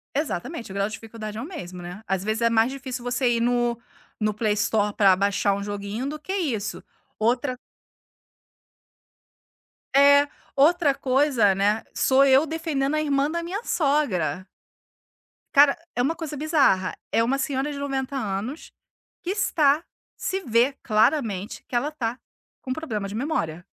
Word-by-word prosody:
Exatamente, 265 - -3
o - - -7
grau 200 0 +1
de 215 - -8
dificuldade 215 -1 -7
é - - -4
o - - -5
mesmo, 185 - -8
né, 180 +4 -8
às 190 -1 -1
vezes 220 +2 -1
é 230 - +4
mais 230 +2 +3
difícil 260 -2 -6
você 245 0 +1
ir 235 -1 +1
no, 240 -1 +1 0.4
no 215 -1 +1
PlayStore 210 -1 +1
para 195 -3 +5
baixar 200 +1 +1
um 200 0 -3
joguinho 205 +5 -4
do 305 +2 -4
que 380 +5 -5
isso. 250 - -2 0.4
Outra 250 +3 0 2.4
é, 285 +1 +7 0.3
outra 300 0 +4
coisa, 260 -7 +2
né, 205 +3 +1
sou 270 +1 +4
eu 275 +3 +5
defendendo 310 -3 -1
a 305 - +1
irmã 285 -1 +1
da 340 +1 -2
minha 395 +7 -4
sogra. 190 - 0 1.1
Cara, 280 0 +6 0.2
é 245 - +1
uma 320 +6 +1
coisa 310 -4 -6
bizarra, 285 - +2 0.2
é 230 - +3
uma 265 +4 +1
senhora 275 +1 -1
de 285 - -6
90 275 -1 -3
anos, 220 +5 -4 0.5
que 360 - -2
está, 320 -6 +2 0.3
se 385 +1 -3
vê 240 +1 +2
claramente 215 -3 +1
que - - -6
ela 285 +6 0
tá 245 -4 -3 0.4
com 255 - -6
problema 225 -10 -3
de 200 - -7
memória. 195 - -2
250 Hz, 155 wpm, -24 LUFS, 210-290 Hz, 2.4 s, é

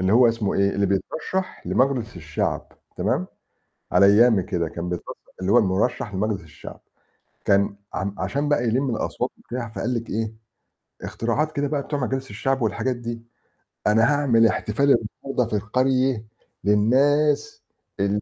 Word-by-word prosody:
اللي 95 +2 +2
هو 120 0 +6
اسمه 115 -3 -1
إيه 100 0 +3
اللي 100 0 +1
بيترشّح 160 - -2
لمجلس 130 -6 +1
الشعب 80 -3 -3 0.2
تمام، - - 0 0.7
على 100 +2 +6
أيامي 105 -1 +5
كده 85 -2 -2
كان 85 +2 -5
بيترشّح 90 -1 -5 0.3
اللي 95 +2 0
هو 120 - +7
المُرشّح 105 +2 0
لمجلس 100 +1 -1
الشعب 75 -2 -11 0.7
كان 100 0 +3 0.2
عم 100 +2 -3
عشان 145 +1 -1
بقى 145 -5 +2
يلِم 130 +4 +1
الأصوات - - -2
وبتاع، 120 -2 -6
فقال 115 +2 -3
لِك 115 -1 -3
إيه، 110 +1 -2 0.7
اختراعات 145 +7 -1
كده 145 -1 -1
بقى 145 -1 -1
بتوع 145 +1 -3
مجالس 135 0 -2
الشعب 135 +6 -1
والحاجات 120 +4 0
دي، 120 -1 -6 0.7
"أنا 105 +2 +4
هاعمل 125 -6 +4
احتفال 110 +4 0 0.4
النهارده 130 -3 0
في 105 - 0
القرية 130 0 +1 0.4
للناس 145 +8 +2 0.4
ال 100 +1 +1
115 Hz, 150 wpm, -23 LUFS, 100-135 Hz, 0.7 s, هو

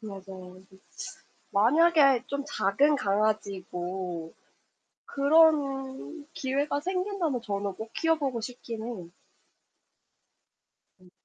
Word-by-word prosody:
맞아요. 190 -3 -9
즈 190 - -17
츠 - - -25 0.7
만약에 275 +3 +5
좀 280 0 -3
작은 285 +4 +2
강아지고 190 -5 -2 0.7
그런 285 -1 +2
기회가 280 +1 -1
생긴다면 365 - -1
저는 200 -2 -3
꼭 220 +2 -8
키워 325 0 +2
보고 265 -6 -2
싶기는 230 -2 -6
해요. 180 -8 -7 1.9
음. 180 -1 -19
245 Hz, 195 characters per minute, -28 LUFS, 195-290 Hz, 1.9 s, 만약에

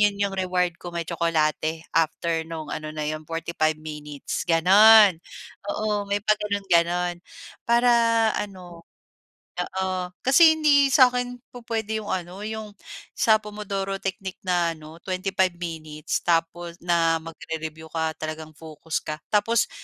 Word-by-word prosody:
'yon 205 -1 +3
yung 200 -1 0
reward 180 -1 0
ko, 175 - -7
may 170 - -2
tsokolate 160 0 0
after 165 +1 +1
nung 160 -2 -6
ano 155 0 -5
na 155 - -3
'yon, 155 0 -4
45 165 -1 -1
minutes, 150 -2 -6
gano'n. 195 +3 +7 0.5
Oo, 210 -1 -2
may 200 - +1
pa-ganun 210 -1 0
ganun 175 +1 +2 0.5
para 240 +1 +4 0.5
ano 180 -4 -9 0.7
oo, 185 0 -3
kasi 315 +4 +6
hindi 285 -2 +4
sa'kin 250 -2 +3 0.2
pupuwede 220 -2 -3
yung 205 - -7
ano, 185 +2 -4
yung 215 -1 -6 0.4
sa 220 -1 +4
Pomodoro 200 -2 -4
technique 190 0 -4
na 175 -3 +1
ano 155 +1 -13
25 185 -1 0
minutes, 155 -3 -4
tapos, 170 0 0
na 165 -2 +2
magre-review 160 -1 -7
ka 160 -1 -1
talagang 155 0 -6
focus 160 0 -5
ka, 155 - -5 0.2
tapos 215 +2 +2
180 Hz, 130 wpm, -24 LUFS, 160-210 Hz, 0.7 s, gano'n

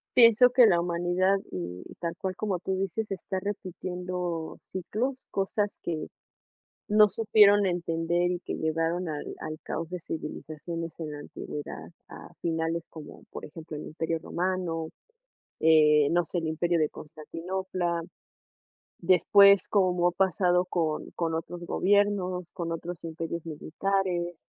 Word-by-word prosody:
Pienso 240 0 +8
que 250 0 +6
la 175 -5 +4
humanidad, 175 +3 +1
mm, 90 0 -5
y - - -12
tal 170 -1 -3
cual 185 -1 -3
como 195 -4 -2
tú 190 +2 -2
dices, 195 +3 -2
está 190 0 -3
repitiendo 180 -3 -4
ciclos, 245 +8 -4
cosas 200 +1 -1
que 160 -3 -3 0.8
no 210 0 +6
supieron 205 -2 +5
entender 175 0 0
y 180 - -2
que - - -6
llevaron 165 +2 -1
al 150 -1 -5
al 155 0 -6
caos 165 0 -4
de 180 0 -4
civilizaciones 165 +1 -6
en 155 -2 -4
la 145 - -7
antigüedad, 145 - -7 0.2
a - - -12
finales 165 0 -1
como, 155 -2 -11
por - - -8
ejemplo, 160 0 -9
el 150 - -6
Imperio 160 +1 -2
Romano, 170 -2 -2 0.7
eh, 150 -2 +6
no 175 0 +2
sé, 175 - -2
el 160 - -3
imperio 170 +2 +1
de 155 -2 +2
Constantinopla. 170 +3 -4 1.0
Después, 200 +2 +6
como 180 -3 +3
ha 175 - -2
pasado 180 -1 +2
con 160 -4 -2
con 165 -2 -1
otros 170 +2 -4
gobiernos, 185 -3 +1
con 170 -2 -4
otros 170 +1 -6
imperios 165 0 -4
militares. 175 +2 -1
175 Hz, 140 wpm, -28 LUFS, 165-190 Hz, 1.0 s, Pienso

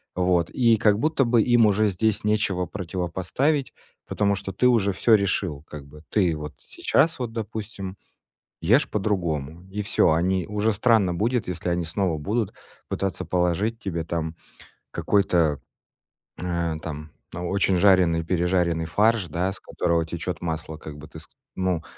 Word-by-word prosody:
Вот. 90 -2 +2
И 115 -3 +3
как 105 -2 +3
будто 150 -2 +2
бы 115 -2 +3
им 120 -2 +5
уже 105 +1 +3
здесь 105 +3 0
нечего 105 -4 +1
противопоставить, 95 - -2 0.3
потому 100 -1 +1
что 95 -1 -6
ты 125 - 0
уже 105 -5 +3
всё 115 +2 +4
решил. 95 -7 -1
Как 75 -2 -9
бы 75 +2 -15
ты 90 -6 +2
вот 75 -1 -7
сейчас 165 -2 +1
вот, 120 -2 -4
допустим, 105 -3 -6 0.6
ешь 115 - +3
по-другому 85 -6 -2
и 105 +1 -3
всё. 100 - +3
Они 90 +2 +1
уже 105 +1 0
странно 105 -4 +3
будет, 115 +5 0
если 90 0 -3
они 85 -1 0
снова 85 -1 -1
будут 105 +6 -2 0.3
пытаться 95 -1 -2
положить 90 +6 0
тебе 85 -7 -3
там 80 -1 -3 0.6
какой-то, 85 -8 +2 0.8
э, 85 -2 -1
там, 75 -1 -7 0.2
очень 90 +2 0
жареный, 90 -4 +4
пережаренный 85 -1 +1
фарш, 105 +2 +2
да, 90 +5 -1
с 95 - -11
которого 85 -2 0
течёт 85 +2 -5
масло, 80 -2 -4
как 75 -1 -9
бы 75 +1 -11
ты 80 0 -11
ск - - -12 0.3
ну, 90 -3 -1
95 Hz, 155 wpm, -24 LUFS, 85-105 Hz, 0.8 s, им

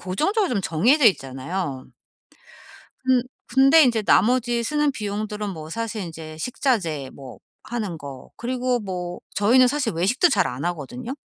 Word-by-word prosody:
고정적으로 330 - 0
좀 205 - 0
정해져 235 - +3
있잖아요. 135 -3 -1 1.2
근 255 -1 +3 0.2
근데 275 +5 +6
인제 235 -5 +2
나머지 240 +4 +3
쓰는 295 +3 +1
비용들은 210 -2 -4
뭐 160 -4 -8
사실 225 +2 -4
인제 160 -2 -8
식자재 170 - -1
뭐 135 -3 -11 0.2
하는 215 -7 -4
거 140 -3 -10
그리고 250 0 -1
뭐 180 -3 -5
저희는 250 +5 +5
사실 265 -3 -1
외식도 200 - +3
잘 - - +2
안 125 +4 -5
하거든요. 175 - -5
210 Hz, 305 characters per minute, -23 LUFS, 165-255 Hz, 1.2 s, 근데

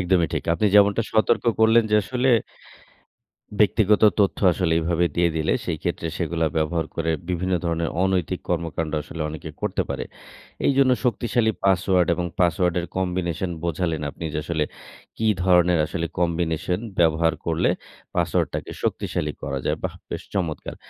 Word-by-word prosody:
একদমই 90 -2 +2
ঠিক। - - -2
আপনি 105 - +1
যেমনটা 105 +2 +5
সতর্ক 110 -1 +2 0.2
করলেন, 115 +1 +6
যে 105 - +5
আসলে 125 +5 -1 1.3
ব্যক্তিগত 105 0 +4 0.2
তথ্য 100 - +2
আসলে 85 -1 0
এইভাবে 85 +1 +1
দিয়ে 85 0 +3
দিলে 80 0 +1
সেই - - -2
ক্ষেত্রে 85 - -2
সেগুলা 80 -1 0
ব্যবহার 80 +1 0
করে 80 0 -1 0.2
বিভিন্ন 90 +1 -1
ধরনের 85 -1 0
অনৈতিক 95 -2 0
কর্মকান্ড 80 -2 -2
আসলে 80 - -9
অনেকে 80 +1 -7
করতে 105 -3 0
পারে। - - -3 0.6
এইজন্য 135 -1 +4
শক্তিশালী 120 -1 +1
পাসওয়ার্ড 95 -2 +3
এবং 90 - -2
পাসওয়ার্ড 90 0 +2
এর 85 - -6
কম্বিনেশন 90 -1 -1
বোঝালেন 85 -1 -1
আপনি 80 - -9
যে, - - -1
আসলে 80 -2 -1 0.5
কি 110 - 0 0.2
ধরনের 90 -2 +4
আসলে 85 +1 -3
কম্বিনেশন 85 +1 0 0.2
ব্যবহার 80 -1 +3
করলে - - +1 0.5
পাসওয়ার্ড - - +1
টাকে - - -5
শক্তিশালী 75 -1 -2
করা 70 0 -2
যায়, - - 0
বাহ! - - -3
বেশ - - -5
চমৎকার। 85 -6 -3
90 Hz, 150 wpm, -23 LUFS, 80-95 Hz, 1.3 s, করলেন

